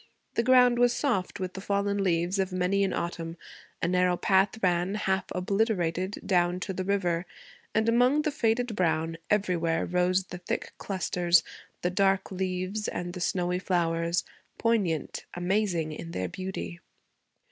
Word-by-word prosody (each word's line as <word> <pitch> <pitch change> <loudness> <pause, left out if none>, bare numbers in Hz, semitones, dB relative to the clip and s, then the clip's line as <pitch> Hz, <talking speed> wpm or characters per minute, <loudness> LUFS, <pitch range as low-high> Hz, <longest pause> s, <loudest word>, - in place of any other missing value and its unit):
The - - +2
ground 250 0 +5
was 245 0 +4
soft 235 -13 -1
with 185 -1 -3
the 190 - -6
fallen 200 0 0
leaves 175 +1 +1
of 190 -1 0
many 185 +2 +1
an 195 - +1
autumn; 170 -1 -4 0.5
a - - +3
narrow 180 0 +2
path 195 +4 +3
ran, 180 +2 +2
half 190 -2 0
obliterated, 185 -1 0
down 180 -1 +2
to 190 - -3
the 185 - -3
river; 180 -3 0 0.5
and 220 +1 +2
among 250 +6 +4
the 305 - 0
faded 240 -4 0
brown, 165 -3 0
everywhere, 175 -5 +1
rose 180 +1 +2
the 180 -1 -9
thick 175 - -4
clusters, 175 -3 +2 0.4
the 180 - +1
dark 195 +1 +2
leaves, 185 +2 -2
and 175 0 -4
the 180 - -6
snowy 180 0 0
flowers 170 -2 0 0.3
poignant, 205 -9 0
amazing 175 -3 0
in 165 +2 -7
their 90 0 -2
beauty. 185 - -5
185 Hz, 150 wpm, -28 LUFS, 175-200 Hz, 0.5 s, ground